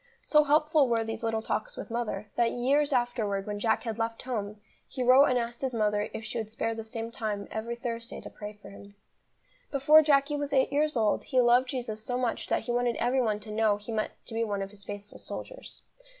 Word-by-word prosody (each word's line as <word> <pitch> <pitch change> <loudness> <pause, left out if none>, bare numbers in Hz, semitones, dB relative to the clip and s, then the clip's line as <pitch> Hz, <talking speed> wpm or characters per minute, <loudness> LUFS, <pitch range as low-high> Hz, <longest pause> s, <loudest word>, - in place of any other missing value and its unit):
So 300 -1 +5
helpful 300 -1 +4
were 230 -1 +2
these 225 0 -5
little 225 -1 -1
talks - - -3
with - - -7
mother, 215 -3 -3
that 235 -1 +2
years 280 +4 +2
afterwards 240 -6 0
when 205 -1 -4
Jack 220 +1 +1
had 225 -2 -4
left 225 0 -2
home, 210 -4 -4 0.3
he 255 - -3
wrote 255 +3 +7
and 255 -3 +2
asked 235 0 -3
his 260 -3 -2
mother 210 -1 +1
if 220 - -6
she 235 - -3
would 220 -1 -4
spare 225 +1 -2
the 225 0 -6
same 225 0 -5
time 210 -3 -3
every 230 +2 -3
Thursday 235 -1 -5
to - - -9
pray 210 0 -8
for 200 - -12
him. 200 0 -13 0.7
Before 300 +3 +6
Jacky 290 -1 +3
was 290 -1 -3
eight 265 0 +3
years 300 -1 +1
old 215 -2 +1
he 260 - +1
loved 245 +1 +5
Jesus 235 -5 -4
so 245 +2 -2
much 245 -2 -1
that - - +1
he 240 - -3
wanted 240 -1 +1
every 260 +2 +1
one 215 -3 0
to 215 0 -9
know 215 -1 +2
he 210 +3 -8
meant 215 -1 -1
to - - -7
be 225 +1 0
one 200 -3 -2
of 195 - -8
His 205 -1 -12
faithful 205 0 -8
soldiers. - - -8
230 Hz, 230 wpm, -29 LUFS, 215-255 Hz, 0.7 s, wrote